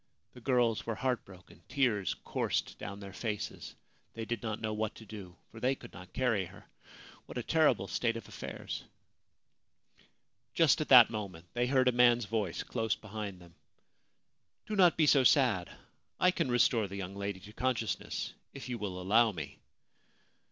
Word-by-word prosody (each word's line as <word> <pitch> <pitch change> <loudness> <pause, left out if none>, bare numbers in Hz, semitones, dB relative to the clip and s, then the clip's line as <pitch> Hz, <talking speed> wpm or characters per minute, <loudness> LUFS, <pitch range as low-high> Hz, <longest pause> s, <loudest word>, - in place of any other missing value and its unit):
The 125 - -13
girls 120 -3 +2
were 115 - -1
heartbroken. 105 -8 -4
Tears 110 -10 +1
coursed - - -2
down 100 0 -6
their 100 -1 -9
faces. 105 -3 -5 0.4
They 115 -1 -4
did 115 -1 -3
not 110 -2 -3
know 110 -1 -2
what 110 0 -2
to 110 - -12
do, 100 -5 -9 0.2
for 110 - -10
they 130 +3 +1
could 120 - -13
not 90 -1 -11
carry 120 -7 +1
her. - - -14 0.6
What - - -8
a 120 - -2
terrible 160 +3 +3
state 115 -1 0
of 115 - -9
affairs! - - -6 1.7
Just 160 -2 +4
at 155 - -3
that 125 -4 +9
moment 95 -6 -6
they 120 0 +1
heard 130 -1 +3
a - - +6
man's 120 -1 +4
voice 105 -4 -2
close 115 -3 -1
behind 105 -3 -7
them: 85 -1 -16 0.6
* - - -50
Do 215 - -3
not 180 -4 +5
be 160 - +4
so 140 -2 +5
sad! 125 - +4 0.5
I 180 - +5
can 140 - -1
restore 120 -3 +3
the 100 - -8
young 95 0 -5
lady 100 -1 -4
to 105 - -12
consciousness 120 -3 -2 0.2
if 140 - -7
you 120 -2 -3
will 95 -3 -4
allow 110 +5 +4
me.' 80 -7 -7
115 Hz, 175 wpm, -32 LUFS, 100-125 Hz, 1.7 s, that